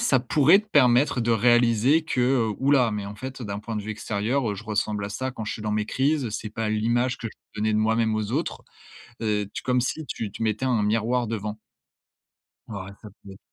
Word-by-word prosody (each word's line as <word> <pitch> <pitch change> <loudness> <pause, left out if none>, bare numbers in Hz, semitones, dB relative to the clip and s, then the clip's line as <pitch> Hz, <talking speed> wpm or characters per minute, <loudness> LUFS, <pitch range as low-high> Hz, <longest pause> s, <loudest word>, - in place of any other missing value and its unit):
ça 140 - +3
pourrait 145 +8 +5
te 215 - -20
permettre 125 -4 +4
de 115 0 0
réaliser 120 +5 +4
que, 125 -5 +1
ouh 135 +1 +1
là 125 -5 +4
mais 105 -1 -4
en 100 - -7
fait 130 +4 -7
heu, - - -5
d'un 100 -1 -4
point 110 +1 -5
de 105 - -3
vue 110 - -5
extérieur 110 +2 -1
je 110 - -9
ressemble 105 -1 -1
à - - -4
ça 130 +5 -3
quand 110 - -6
je 110 - -3
suis 110 - -8
dans 105 - -2
mes 105 0 0
crises, 140 -1 0
c'est 105 0 -5
pas 110 0 -3
l'image 120 +4 +1
que 115 - -4
je - - -13 0.2
veux - - -4
donner 110 - +2
de - - +2
moi-même 110 +1 +2
aux 110 +1 -3
autres. 155 +6 -2 0.6
Heu, 105 -2 0
tu - - -5
comme 125 -1 +1
si 150 +4 -3
tu 110 -4 -4
tu - - -6
mettais 110 +3 0
un 120 -5 +2
miroir 115 +4 +1
devant. 105 -1 -4 1.1
Ouais 100 -2 -7
ça 105 - -10
peut-être 95 -1 -12
115 Hz, 230 wpm, -25 LUFS, 105-125 Hz, 1.1 s, pourrait